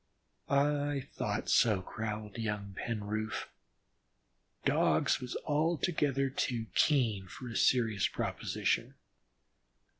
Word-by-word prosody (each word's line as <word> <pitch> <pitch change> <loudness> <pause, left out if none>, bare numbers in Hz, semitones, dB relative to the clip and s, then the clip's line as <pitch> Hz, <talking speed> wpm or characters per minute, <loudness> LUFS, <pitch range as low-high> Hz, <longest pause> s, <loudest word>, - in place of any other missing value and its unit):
"I 145 0 +2
thought - - -2
so," 105 -5 +4
growled 105 +1 -5
young 105 -3 -3
Penroof. 110 0 -3 1.2
"Dogs - - +3
was 125 -1 -4
altogether 150 -3 +1
too 120 -4 -1
keen 115 -10 +2
for 125 +7 -9
a 115 - -7
serious 110 -6 +3
proposition. - - -1
115 Hz, 90 wpm, -32 LUFS, 105-140 Hz, 1.2 s, so